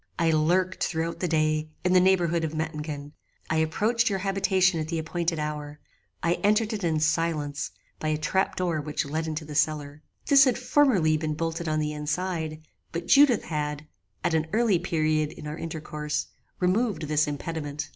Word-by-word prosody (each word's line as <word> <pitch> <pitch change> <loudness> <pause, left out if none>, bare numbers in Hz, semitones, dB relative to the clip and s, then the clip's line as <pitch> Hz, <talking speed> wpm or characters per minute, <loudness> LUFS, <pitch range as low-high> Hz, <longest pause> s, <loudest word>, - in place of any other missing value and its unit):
"I 165 -1 +3
lurked, 175 +4 +2
through 165 0 -1
the 180 - 0
day, 155 -1 +1 0.2
in 180 - +3
the 185 - +7
neighbourhood 175 -3 +3
of 160 0 -3
Mettingen: 150 -2 -4 0.4
I 160 - +2
approached 215 +10 +1
your 195 - 0
habitation 190 -2 +2
at 155 - -3
the 165 0 -2
appointed 165 +1 -1
hour: 150 -1 -4 0.4
I 170 +1 +3
entered 215 +2 +3
it 205 -3 -4
in 160 -2 +1
silence, 155 -2 0 0.3
by 155 - -3
a 155 0 +1
trap 190 +5 0
door 170 -4 -1
which 150 0 -2
led 160 +3 -2
into 155 0 -4
the 150 - -8
cellar. 150 -1 0 0.2
This 275 -1 +7
had 255 -2 +2
formerly 240 - +3
been 155 -1 -2
bolted 165 +1 -3
on 155 - 0
the 150 0 -1
inside, 155 +1 -3 0.3
but 170 +1 -4
Judith 275 -5 +5
had, 150 -1 -3 0.4
at - - +1
an 160 0 +1
early 220 -5 +3
period 155 -3 0
in 160 - -10
our 150 0 -4
intercourse, 150 -2 -3 0.3
removed 195 +1 +1
this 150 0 +1
impediment. 145 -1 -4
160 Hz, 175 wpm, -26 LUFS, 155-180 Hz, 0.4 s, the